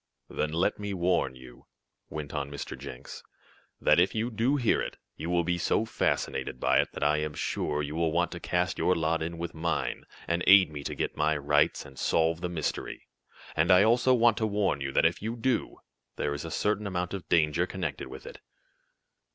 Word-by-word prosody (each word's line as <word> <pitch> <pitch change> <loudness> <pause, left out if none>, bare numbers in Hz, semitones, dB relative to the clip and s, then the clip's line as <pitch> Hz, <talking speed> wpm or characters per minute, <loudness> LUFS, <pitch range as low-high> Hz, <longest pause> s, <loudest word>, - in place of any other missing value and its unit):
"Then 75 - -1
let 85 +7 0
me 100 -1 -3
warn 90 -6 +1
you," 65 -1 -14 0.4
went 75 -2 -6
on 70 - -3
Mr. 70 0 -6
Jenks, 60 - -9 0.6
"that 75 - +4
if 90 +5 +2
you 115 +3 -1
do 115 +6 +1
hear 125 -6 +2
it, - - -5 0.2
you 80 - -5
will 85 -1 +2
be 90 +1 -1
so 105 +5 +1
fascinated 65 - -1
by - - +3
it - - +1
that - - -4
I 75 +1 +3
am 75 -1 -3
sure 75 0 -2
you 75 +1 -4
will 80 0 0
want 85 +2 +1
to 85 - -6
cast 90 +2 -1
your 90 - +3
lot 80 0 0
in 85 +1 -4
with 85 0 -5
mine, 85 +1 -2 0.2
and 85 +1 0
aid 95 -4 +7
me 75 -1 -6
to - - -3
get - - -2
my 75 0 +1
rights, 75 +1 +2
and 65 -1 -12
solve 80 +1 +1
the 90 - -2
mystery. 80 -4 -4 0.5
And 80 +3 +2
I 90 +1 +7
also 120 +3 +4
want 115 -2 +4
to 110 - +1
warn 100 -8 0
you 70 0 -2
that - - +3
if - - +2
you 110 +3 -3
do, 120 +1 -1 0.4
there 75 - -1
is 70 - -5
a - - -5
certain 105 +4 0
amount 90 -1 -3
of 95 -3 -6
danger 85 +2 +3
connected 85 -8 -4
with 65 - -10
it." - - -10
85 Hz, 210 wpm, -28 LUFS, 75-100 Hz, 0.6 s, aid